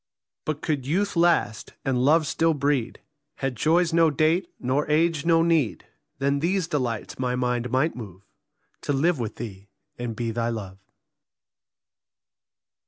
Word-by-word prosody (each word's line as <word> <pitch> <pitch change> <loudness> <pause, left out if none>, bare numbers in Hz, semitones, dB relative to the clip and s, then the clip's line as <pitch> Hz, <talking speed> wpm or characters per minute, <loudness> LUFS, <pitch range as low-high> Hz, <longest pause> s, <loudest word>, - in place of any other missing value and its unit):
But 155 -1 -3
could 140 -4 -1
youth 195 +7 0
last, 170 -9 +1
and 125 -2 +1
love 155 +3 +4
still 165 +2 +1
breed, 140 -4 -1 0.3
Had 135 -2 -3
joys 165 +7 +2
no 165 -1 +5
date, 160 +5 +1
nor 135 +4 0
age 160 0 +2
no 165 -1 +5
need, 160 - +1 0.3
Then 140 +1 +1
these 180 +2 0
delights 125 -9 -3
my 125 -1 0
mind 125 -1 -1
might 135 +7 +1
move 100 -5 -9 0.6
To 145 - -1
live 155 +3 +2
with 115 -3 -4
thee 100 -4 -8 0.3
and 120 -2 -4
be 115 0 -2
thy 115 +1 -1
love. 100 -5 -6
140 Hz, 145 wpm, -25 LUFS, 120-165 Hz, 0.6 s, no